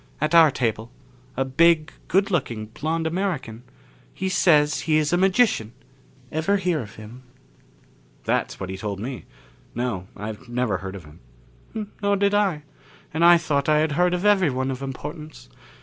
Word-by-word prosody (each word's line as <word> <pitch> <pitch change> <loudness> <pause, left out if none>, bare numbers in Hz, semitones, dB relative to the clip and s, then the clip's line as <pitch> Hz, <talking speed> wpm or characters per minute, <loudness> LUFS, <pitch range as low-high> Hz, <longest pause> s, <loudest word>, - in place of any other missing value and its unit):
At 155 +2 -1
our 165 -2 +8
table 115 -4 -2 0.5
a 135 - +1
big, 160 +3 +3 0.2
good 195 +3 +2
looking 120 - -1
blond 160 +9 -3
American. 160 - -2 0.5
He 190 - -3
says 155 -5 +3
he 155 -1 +1
is 155 +1 +1
a - - +5
magician. 190 - +2 0.6
Ever 160 +6 +1
hear 180 -4 0
of 105 -7 -8
him?" 110 +4 -11 1.0
"That's - - -1
what 95 0 -5
he 95 - -5
told 100 0 -4
me. 125 +3 -6 0.5
No, 115 -7 -3
I 105 +1 -5
never 120 -5 -1
heard 95 0 -7
of 90 -5 -10
him." 75 0 -16 0.8
"Nor 200 0 +2
did 200 +1 +2
I. 195 -8 +1 0.5
And 160 +2 0
I 175 0 +8
thought 150 -4 -1
I 155 - +4
had 155 0 +1
heard 180 +4 +2
of 180 +3 -3
everyone 145 -11 +2
of 130 0 -6
importance. 150 - -8
150 Hz, 165 wpm, -23 LUFS, 120-175 Hz, 1.0 s, our